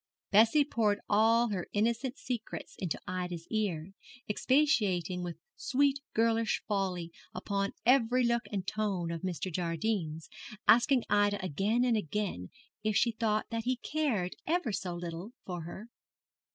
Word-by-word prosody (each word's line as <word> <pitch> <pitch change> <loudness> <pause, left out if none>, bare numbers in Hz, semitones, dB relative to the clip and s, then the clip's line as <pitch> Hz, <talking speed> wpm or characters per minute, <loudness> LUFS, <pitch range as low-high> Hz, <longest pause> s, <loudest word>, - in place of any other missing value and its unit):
Bessie 225 +8 +6
poured 215 -7 +1
all 225 +3 +4
her 185 -4 -3
innocent 235 +5 0
secrets 245 -3 -5
into 180 -5 -2
Ida's 180 -2 -4
ear, 195 -5 -1 0.3
expatiating 205 - +2
with 175 -1 -5 0.2
sweet 280 +1 +2 0.2
girlish 225 0 +2
folly 185 -5 -1 0.2
upon 200 -1 -1
every 250 0 +4
look 235 -2 +1
and 195 -3 -2
tone 195 -5 -1
of 165 -1 -4
Mr. 180 -1 -3
Jardine's, 165 -1 -2 0.4
asking 245 +1 +5
Ida 205 0 +3
again 205 - +1
and 240 -2 +3
again 200 - -2 0.3
if 215 -1 +2
she 235 - +3
thought 220 -1 -1
that 230 0 -2
he 255 +1 +2
cared, 245 -10 -1
ever 325 -7 +1
so 180 -3 -3
little, 175 +5 -6
for 175 -3 -5
her. 190 +6 -8
210 Hz, 140 wpm, -31 LUFS, 180-235 Hz, 0.4 s, Bessie